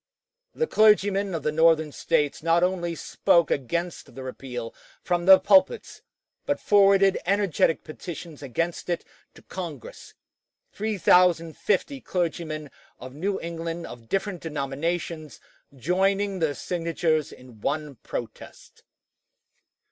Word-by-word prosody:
The 475 - +1
clergymen 205 - +3
of 155 - -4
the 150 - 0
Northern 160 -1 +3
States 145 0 0
not 165 +2 +3
only 175 -2 -1
spoke 170 +1 +2
against 170 +6 -3
the 135 - -7
repeal 125 -3 -6 0.3
from 175 0 -1
their 190 0 +10
pulpits, 285 - +2 0.5
but - - 0
forwarded 195 -1 +4
energetic 195 -4 +1
petitions 160 -1 -9
against 165 +7 -3
it 175 - -2 0.3
to - - -16
Congress, 165 -9 -8 0.6
3050 185 - +2
clergymen 160 -4 -3 0.3
of 130 0 -9
New 190 +7 -2
England 165 0 -5
of 115 -2 -11
different 195 -2 -2
denominations 155 +2 -4 0.4
joining 195 - 0
their 155 -4 0
signatures 165 -3 -1
in 125 -4 -15
one 150 +2 -2
protest. 120 - -8
170 Hz, 110 wpm, -25 LUFS, 150-190 Hz, 0.6 s, their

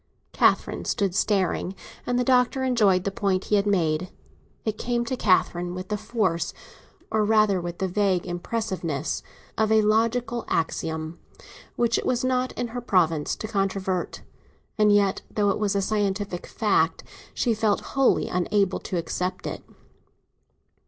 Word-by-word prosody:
Catherine - - +2
stood 195 -3 0
staring, 190 -1 0 0.3
and 245 - +1
the 250 - +2
Doctor 255 +1 +2
enjoyed 210 -8 +3
the 200 - -1
point 195 -3 0
he 210 - +2
had 200 0 +2
made. 175 -3 +1 0.6
It 215 -1 -2
came 240 0 -1
to 255 - -2
Catherine 180 -4 +1
with 185 0 -6
the 210 - 0
force—or 215 0 -3
rather 210 -3 +3
with 175 0 -5
the 190 - -1
vague 190 -1 +1
impressiveness—of 190 - -3
a 220 -1 +5
logical 230 +2 +1
axiom 160 0 -2 0.6
which 235 -1 +2
it - - -6
was 250 0 +1
not 255 0 +1
in 245 -1 -3
her 245 +2 -5
province 165 -9 +1
to 215 - -6
controvert; 195 -3 -2 0.5
and 210 -1 +4
yet, 200 -2 +3
though 205 -1 +1
it - - -2
was 205 -1 0
a 200 - +1
scientific 200 -3 -1
truth, 170 -7 +1 0.3
she 235 - +1
felt 215 -2 +1
wholly 270 -2 +3
unable 190 +2 +1
to 185 - -4
accept 180 +2 -3
it. - - -5
205 Hz, 145 wpm, -25 LUFS, 185-225 Hz, 0.6 s, a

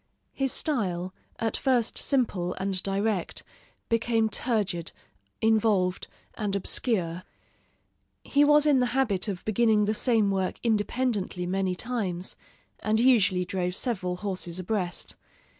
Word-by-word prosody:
His 270 -2 0
style, 185 - -1 0.2
at 225 -1 -1
first 250 -4 +1
simple 205 -10 0
and 190 -1 -2
direct, 195 -1 -2 0.4
became 230 -1 +1
turgid, 205 -9 -1 0.5
involved, 215 -5 +2 0.3
and 205 -3 -3
obscure. 185 -4 0 1.0
He 285 +1 +3
was 295 0 +5
in 290 -3 +4
the 250 - +2
habit 220 -7 +1
of 190 -4 -5
beginning 220 -1 +3
the 215 - 0
same 220 -3 +2
work 190 -1 -2
independently 215 -4 -1
many 185 0 -1
times, 190 -6 -3 0.4
and 215 +1 +1
usually 215 -7 +4
drove 180 -1 -2
several 185 -8 0
horses 185 -2 -4
abreast. 185 -1 -3
210 Hz, 120 wpm, -27 LUFS, 185-235 Hz, 1.0 s, was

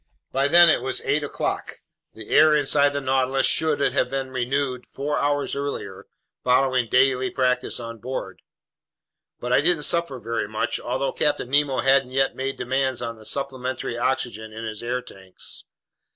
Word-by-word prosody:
By 135 +1 +2
then 175 +3 +7
it 155 - +3
was 130 +1 -1
eight 150 +1 +1
o'clock. 145 - -3 0.4
The 110 -1 -10
air 155 -1 +6
inside 145 0 +4
the 140 0 -3
Nautilus 130 0 +1
should 155 -2 +2
have 130 - +1
been 135 0 -3
renewed 130 0 -2
four 145 +2 -3
hours 145 0 0
earlier, 140 -9 -5 0.4
following 130 -1 +2
daily 130 0 +3
practice 125 -1 0
on 115 -1 -7
board. 120 -6 -6 1.0
But 125 +1 -2
I 130 - +5
didn't 165 -1 +2
suffer 170 -4 0
very 115 -2 -3
much, 110 +1 -2
although 130 +3 -2
Captain 145 -4 -1
Nemo 140 -2 +2
hadn't 135 -1 +3
yet 135 0 +1
made 135 +1 -3
demands 130 0 -1
on 115 -1 -4
the 110 - -14
supplementary 130 -3 -3
oxygen 120 -3 -2
in 110 +1 -7
his 110 -1 -5
air 125 +1 -2
tanks. 95 -1 -8
130 Hz, 165 wpm, -24 LUFS, 120-140 Hz, 1.0 s, then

